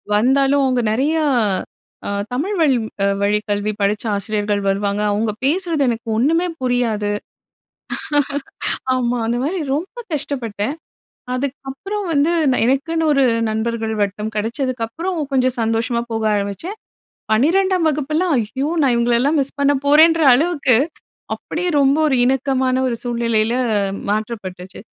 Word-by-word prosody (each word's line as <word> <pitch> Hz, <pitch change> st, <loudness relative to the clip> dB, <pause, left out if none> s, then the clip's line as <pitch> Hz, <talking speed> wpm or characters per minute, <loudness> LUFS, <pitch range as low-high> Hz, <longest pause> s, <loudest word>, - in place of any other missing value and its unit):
வந்தாலும், 270 Hz, +5 st, +3 dB
அவங்க 255 Hz, -2 st, +1 dB
நெறையா 305 Hz, +7 st, +1 dB, 0.8 s
அ -, -, -2 dB, 0.2 s
தமிழ் 360 Hz, +11 st, -1 dB
வழ் 300 Hz, -5 st, +4 dB, 0.3 s
அ -, -, +4 dB, 0.2 s
வழி 205 Hz, +1 st, +3 dB
கல்வி 205 Hz, +1 st, 0 dB
படிச்ச 205 Hz, +2 st, +1 dB
ஆசிரியர்கள் 205 Hz, 0 st, -1 dB
வருவாங்க. 200 Hz, +1 st, 0 dB
அவங்க 215 Hz, +1 st, 0 dB
பேசுறது 330 Hz, 0 st, +1 dB
எனக்கு 230 Hz, 0 st, -4 dB
ஒன்னுமே 330 Hz, +8 st, +2 dB
புரியாது. 235 Hz, -5 st, 0 dB, 1.9 s
ஆமா. 245 Hz, -1 st, 0 dB
அந்த 235 Hz, +1 st, 0 dB
மாறி 345 Hz, +4 st, -1 dB
ரொம்ப 370 Hz, +11 st, -4 dB
கஷ்டப்பட்டேன். 255 Hz, -4 st, -2 dB, 0.6 s
அதுக்கப்பறம் 280 Hz, +10 st, -4 dB
வந்து 295 Hz, +3 st, +3 dB, 0.2 s
நான் 255 Hz, -, +1 dB
எனக்குன்னு 320 Hz, +5 st, +1 dB
ஒரு 275 Hz, -2 st, +3 dB, 0.3 s
நண்பர்கள் 220 Hz, 0 st, -2 dB
வட்டம் 210 Hz, +2 st, -3 dB
கெடச்சதுக்கப்புறம் 255 Hz, -, -2 dB
கொஞ்சம் 255 Hz, -1 st, +2 dB
சந்தோஷமா 230 Hz, +1 st, 0 dB
போக 225 Hz, 0 st, -1 dB
ஆரம்பிச்சேன். 205 Hz, -, -3 dB, 0.6 s
12ஆம் 355 Hz, -, +3 dB
வகுப்பெல்லாம், 310 Hz, +4 st, 0 dB
ஐயோ! 265 Hz, +7 st, -3 dB
நான் 265 Hz, -3 st, +3 dB
இவங்களலாம் 240 Hz, +6 st, +2 dB
மிஸ் 275 Hz, +1 st, -4 dB
பண்ண 280 Hz, 0 st, +4 dB
போறேன்ற 320 Hz, +3 st, +6 dB
அளவுக்கு, 285 Hz, -4 st, +3 dB, 0.6 s
அப்படியே 360 Hz, +2 st, -4 dB
ரொம்ப 275 Hz, +2 st, +4 dB
ஒரு 275 Hz, -, +2 dB
இணக்கமான 260 Hz, 0 st, +1 dB
ஒரு 240 Hz, -, -1 dB
சூழ்நிலையில 235 Hz, -1 st, 0 dB, 0.6 s
மாற்றப்பட்டுச்சு. 205 Hz, -4 st, -5 dB
255 Hz, 120 wpm, -19 LUFS, 220-300 Hz, 1.9 s, போறேன்ற